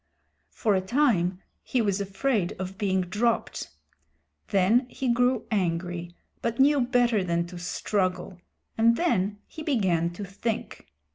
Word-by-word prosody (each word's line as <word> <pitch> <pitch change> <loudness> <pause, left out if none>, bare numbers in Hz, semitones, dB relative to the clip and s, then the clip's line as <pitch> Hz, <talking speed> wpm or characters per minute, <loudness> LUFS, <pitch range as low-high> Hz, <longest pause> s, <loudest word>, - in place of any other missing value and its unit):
For 215 -4 0
a 190 - +2
time 190 -6 +1 0.2
he 255 - -1
was 200 -3 +1
afraid 200 0 0
of 190 +1 -5
being 190 -3 +1
dropped. 210 +6 -1 0.8
Then 215 +7 +3
he 255 -2 0
grew 245 0 +2
angry 175 -3 -2 0.3
but 230 0 -2
knew 280 +1 +5
better 240 -4 +2
than 170 -1 0
to 175 0 -9
struggle, 180 0 -2 0.4
and 230 +1 +5
then 210 - +1
he 315 - -10
began 190 - +1
to 200 +3 -6
think. 210 +4 -4
200 Hz, 135 wpm, -27 LUFS, 180-240 Hz, 0.8 s, knew